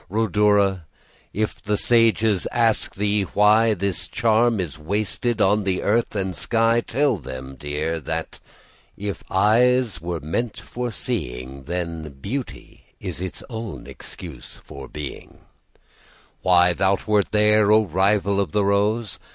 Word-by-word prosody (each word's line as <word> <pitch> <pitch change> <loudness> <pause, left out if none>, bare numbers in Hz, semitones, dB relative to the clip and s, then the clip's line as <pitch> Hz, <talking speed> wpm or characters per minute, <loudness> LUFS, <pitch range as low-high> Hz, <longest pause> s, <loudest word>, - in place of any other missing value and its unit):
Rhodora! 105 -3 +2 0.5
if 110 +1 -2
the 105 0 -1
sages 115 -4 +3
ask 115 -2 +1
thee 105 0 +1
whyThis 105 -2 +2
charm 115 -1 +2
is 75 -5 -4
wasted 105 +6 -1
on 105 +1 +3
the 95 -2 -1
earth 115 +2 +1
and 95 -2 -1
sky, 115 +4 +2
Tell 135 0 +1
them, 65 -2 -8
dear, 75 +4 -3
that 75 - -4 0.6
if 100 0 -5
eyes 110 0 +3
were 85 0 -3
made 100 - -3
for 125 0 -5
seeing, 70 - -5
Then 85 -4 -5
Beauty 125 - -6 0.2
is - - -5
its 95 -1 -6
own 110 -3 -6
excuse 80 -9 -10
for 70 -1 -10
being:Why 90 +4 -3
thou 95 +3 +2
wert 105 -2 +2
there, 105 0 +4
O 110 0 +5
rival 100 +2 +1
of 95 -6 -1
the 105 -1 +2
rose! 105 +2 0
100 Hz, 125 wpm, -23 LUFS, 85-110 Hz, 0.6 s, O